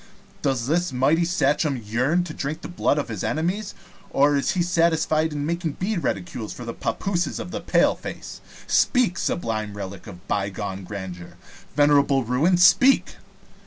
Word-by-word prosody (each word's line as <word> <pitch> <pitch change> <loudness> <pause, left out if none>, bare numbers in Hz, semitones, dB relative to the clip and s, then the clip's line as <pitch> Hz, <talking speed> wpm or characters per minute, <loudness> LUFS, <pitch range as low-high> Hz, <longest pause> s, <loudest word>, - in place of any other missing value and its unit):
Does 135 -5 0
the 165 0 0
mighty 145 +7 +3
Sachem 150 -4 +1
yearn 125 +10 0
to 165 -3 -7
drink 150 +4 -4
the - - -6
blood 175 -4 0
of 145 - -1
his 110 -4 -4
enemies, 185 +6 -2 0.3
or 145 +1 +3
is 140 +7 +1
he 180 -3 +1
satisfied 165 -2 +2
to 150 - -7
make 160 +1 -2
bead 190 -1 -1
reticules 100 - -3
for 120 - -9
the 115 - -4
pappooses 180 +5 -2
of 180 - -6
the - - -4
paleface? - - -1 0.2
Speak, 245 -9 +2
sublime 110 -8 -2
relic 100 -1 -7
of 90 +2 -12
bygone 100 -1 -3
grandeur 95 -3 -8 0.4
venerable 145 -2 +4
ruin, 140 +10 +2
speak!" 195 +9 +5
145 Hz, 155 wpm, -24 LUFS, 115-175 Hz, 0.4 s, speak